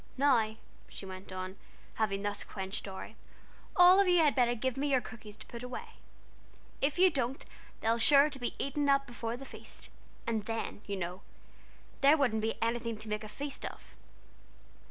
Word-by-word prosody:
"Now," 240 -6 +3 0.3
she - - -8
went 190 0 -9
on, 185 +1 -5 0.4
having 200 -2 -1
thus 205 0 -1
quenched 190 0 -5
Dorry, 190 -1 -8 0.6
"all 360 +2 +8
of 400 - +5
you 355 -1 +5
had 310 -4 +5
better 245 -2 +3
give 260 +2 -1
me 285 +2 -1
your 265 -2 +4
cookies 215 -2 -10
to - - -12
put 235 - -8
away: 250 0 -6 0.9
if 280 +3 +2
you 370 0 +6
don't, 265 -2 -2 0.4
they'll 225 +1 +2
be - - -2
sure 280 +4 +7
to 280 -3 -7
be 245 - -3
eaten 285 +1 0
up 275 0 +4
before 240 -1 -4
the 270 - -9
feast, - - -10 0.3
and 225 -3 -1
then 225 -2 -3
you 200 - -2
know 180 +1 -4 0.8
there 285 +3 +7
wouldn't 240 -7 +2
be 225 +1 0
anything 230 -1 -1
to 215 +1 -8
make 210 0 -2
a 215 - -7
feast 280 +5 -6
of." - - -8
235 Hz, 185 wpm, -32 LUFS, 215-275 Hz, 0.9 s, all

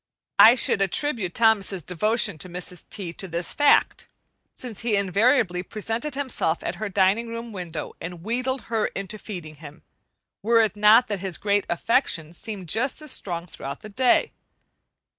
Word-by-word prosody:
I 230 +3 +9
should 230 - +2
attribute 195 - 0
Thomas's 205 -6 +2
devotion 210 0 +1
to 185 - -5
Mrs. 180 0 -6
T. 185 -5 -4
to 190 - -5
this 170 0 -2
fact, 290 -1 +3 0.5
since 240 -5 -6
he 230 -3 +1
invariably 200 0 +2
presented 225 - -4
himself 255 - -1
at - - -4
her 215 - -2
dining 195 +4 +2
room 230 0 -6
window 175 -6 -6
and 170 0 -7
wheedled 255 +4 -2
her 225 -2 -1
into 195 +2 -6
feeding 170 -9 -8
him, 150 +1 -12 0.6
were 230 +3 +4
it 220 -1 0
not 215 +4 +6
that 205 -2 -2
his 190 -2 -3 0.3
affection 170 - 0
seemed 195 -1 -7
just 240 - 0
as 305 - -4
strong 175 -7 -3
throughout 140 -5 -8
the 215 - -10
day. 250 +4 +2
205 Hz, 160 wpm, -24 LUFS, 180-230 Hz, 0.6 s, I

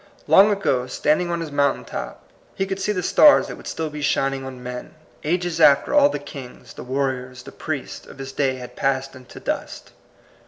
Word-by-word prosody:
Long 200 +2 +7
ago, 135 -12 0
standing 155 +7 +1
on 170 -1 -2
his 160 -3 -5
mountain 140 -1 +1
top, - - -7 0.3
he 195 - -1
could 195 0 -4
see 210 - 0
the 185 -3 -2
stars 295 - +6
that - - -7
would - - -12
still 160 -1 -3
be 150 0 -6
shining 135 -1 0
on 130 -1 -8
men, 125 +3 -7 0.3
ages 170 +1 -1
after 140 - +5
all 290 -1 +6
the - - -3
kings, 125 -3 -10
the - - -9
war 135 +2 0
riors, 130 0 -9
the - - -11
priests, - - -6
of - - -13
his 135 0 -7
day 135 -1 0
had 125 -1 -10
passed 135 0 -1
into 130 -1 -12
dust. - - -5
140 Hz, 205 wpm, -22 LUFS, 130-175 Hz, 0.3 s, Long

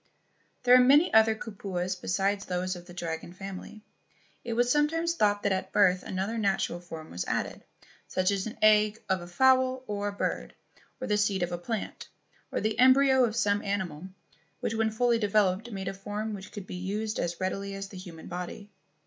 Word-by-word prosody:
There 250 0 +7
were 255 - +7
many 290 +7 +5
other 220 0 +6
kupuas 195 -4 -4
besides 195 +3 -1
those 185 +1 -2
of 175 0 -11
the 175 - -11
dragon 165 0 -5
family. 195 +3 -8 0.6
It 235 - -3
was 245 +1 +2
sometimes 325 +4 +2
thought 205 -8 +1
that 200 - +1
at 190 0 -2
birth 185 -3 +4
another 195 +5 -3
natural 195 -4 0
form 165 -2 -9
was 90 - -3
added, - - -3 0.4
such 185 +1 +1
as 195 +1 -1
an 220 - -8
egg 215 0 +5
of 190 -2 0
a 175 - -8
fowl 260 +5 +3
or 205 -2 -3
a - - -1
bird, 200 - -3 0.4
or 255 - -4
the 210 -3 +1
seed 200 -3 +1
of 175 - -2
a 175 - -2
plant, 220 +4 -5 0.4
or - - -1
the 215 +2 -1
embryo 260 0 +6
of 220 -2 -3
some 205 -3 +2
animal, 185 -5 -3 0.5
which - - -2
when 225 0 +1
fully 235 +1 +2
developed 210 0 +1
made 190 -2 -5
a 195 - -2
form 205 +3 -4
which 195 -1 -8
could 205 -3 -7
be - - -9
used 205 +4 -3
as 170 0 -2
readily 195 +1 -3
as 195 0 -6
the 195 - -10
human 175 -3 -10
body. 180 +4 -7
205 Hz, 195 wpm, -28 LUFS, 185-220 Hz, 0.6 s, There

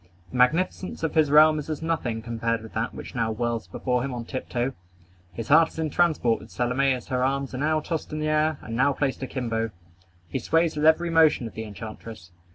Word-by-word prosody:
The 130 - -4
magnificence 165 +8 +1
of 160 - 0
his 155 -3 +3
realm 155 +1 +6
is 150 - -7
as 155 0 -4
nothing 125 -9 -2
compared 115 -1 -2
with 110 - -11
that 110 +2 -2
which - - -8
now 115 -2 0
whirls 115 -3 -2
before 125 +7 -1
him 130 0 -3
on 120 -1 -5
tiptoe. 130 0 -3 0.6
His 110 +5 -7
heart 160 +2 +6
is - - -16
in 160 -2 -2
transport 155 -10 +2
with - - -13
Salome 125 +3 +1
as 125 0 -3
her 125 -1 0
arms 135 0 -1
are 130 - -4
now 155 +2 +1
tossed 160 0 -4
in 155 - -3
the 155 0 -1
air, 155 0 +2
and 115 - -5
now 135 +3 +3
placed 135 -1 -2
akimbo. 115 -4 -2 0.6
He 85 - -3
sways 165 0 +1
with 150 +1 +2
every 170 +2 +4
motion 160 -6 +4
of 115 - -7
the 110 - -5
enchantress. 110 -3 -9
130 Hz, 220 wpm, -25 LUFS, 115-155 Hz, 0.6 s, realm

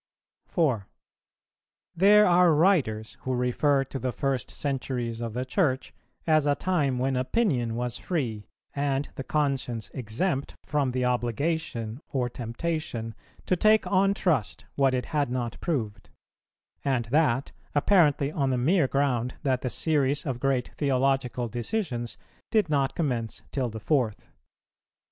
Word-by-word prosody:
4. 130 - 0 1.1
There 205 +4 +6
are 175 -2 +5
writers 145 - +2
who 130 0 -1
refer 135 +3 +2
to 135 0 -6
the 130 -1 -1
first 130 -1 -2
centuries 125 -4 -3
of 115 -1 -4
the 125 +1 -2
Church 130 -3 0 0.3
as 155 -2 +3
a 145 - +3
time 145 -9 0
when 130 +1 0
opinion 130 - 0
was 120 0 -2
free, 120 - -3 0.3
and 140 0 0
the 135 - -6
conscience 135 -6 -1
exempt 135 - -2
from 145 -3 0
the 125 0 -1
obligation 120 -1 -1
or 125 -3 -1
temptation 120 -1 -4 0.3
to 185 - +2
take 215 +4 +4
on 195 +1 +3
trust 150 - 0
what 135 -2 +2
it 125 - -2
had 145 -4 0
not 120 -2 -3
proved; 110 - -3 0.7
and 130 -4 0
that, 140 -4 +2 0.2
apparently 145 -3 +3
on 140 -4 0
the 130 - +1
mere 150 +4 +3
ground 125 -3 0
that 130 -2 +1
the 125 - -2
series 145 -1 0
of 130 -4 -2
great 135 -2 0
theological 135 -3 +1
decisions 120 - -3 0.3
did 210 -8 +2
not 140 -2 +1
commence 125 -8 -2
till 130 -3 -1
the 110 0 -7
fourth. 120 -3 0
135 Hz, 140 wpm, -27 LUFS, 120-155 Hz, 1.1 s, There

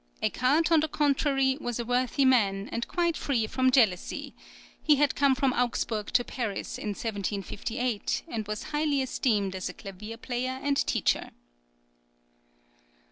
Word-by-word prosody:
Eckart, 295 - +2
on 325 - +6
the 310 - +1
contrary, 275 -2 +1
was 240 -1 -3
a 235 - -2
worthy 250 +3 +1
man, 205 -6 +3
and 235 - -2
quite 340 -2 0
free 250 -8 0
from 260 +4 +2
jealousy; 220 -9 +1 0.5
he 300 - +5
had 290 0 +2
come 275 -2 +3
from 265 -1 +1
Augsburg 230 -3 -1
to 245 - +4
Paris 230 -6 -4
in - - -5
1758, 210 +2 -2
and 220 -8 -4
was 210 0 -4
highly 295 -2 +1
esteemed 210 -7 0
as 185 -1 -3
a - - -7
clavier 210 +3 -8
player 255 +2 -3
and 285 -1 +1
teacher. - - +1
250 Hz, 145 wpm, -28 LUFS, 215-275 Hz, 0.5 s, on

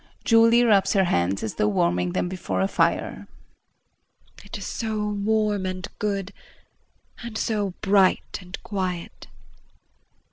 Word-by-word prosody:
Julie 230 +1 +5
rubs 205 -5 +4
her 195 -2 +4
hands 95 - 0
as 110 - -3
though 105 - +1
warming 90 -3 +1
them - - 0
before 185 0 -3
a 190 - +2
fire]. - - 0 1.2
It - - -7
is - - -7
so 220 -2 -3
warm 210 -1 0
and 185 +1 -4
good 200 -3 -2 0.9
and 235 -2 -6
so 205 -5 -1
bright 195 -1 +2
and 180 +1 -8
quiet! 185 -4 -4
195 Hz, 130 wpm, -24 LUFS, 180-215 Hz, 1.2 s, Julie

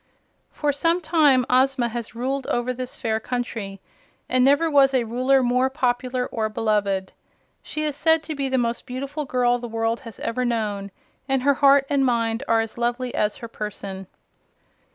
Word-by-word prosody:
For 295 -1 -1
some 330 +5 +2
time 295 -7 +3
Ozma 255 -1 +2
had 235 -1 -6
ruled 265 +3 -2
over 245 +1 -1
this 255 0 -6
fair 220 -1 -1
country, 225 -5 -4 0.5
and 255 0 +2
never 285 +5 +4
was 275 -3 +4
Ruler 255 +3 +2
more 250 +2 +2
popular 250 -2 -1
or 220 -3 -2
beloved. 205 -3 -1 0.5
She 305 - -4
is 300 -2 -2
said 320 +2 +3
to 315 - -5
be 275 -2 -2
the 260 - +1
most 235 -1 -1
beautiful 275 +4 -4
girl 245 -1 +1
the 240 - -6
world 225 0 -1
has 230 -4 -11
ever 250 +2 -1
known, 210 -5 -2 0.4
and 265 -1 +1
her 280 +1 +4
heart 275 0 +5
and 280 -1 +1
mind 230 -2 +1
are 225 0 +3
as 225 +1 -6
lovely 240 +1 -1
as 210 0 0
her 230 - -8
person. 200 -3 -6
250 Hz, 175 wpm, -23 LUFS, 230-270 Hz, 0.5 s, heart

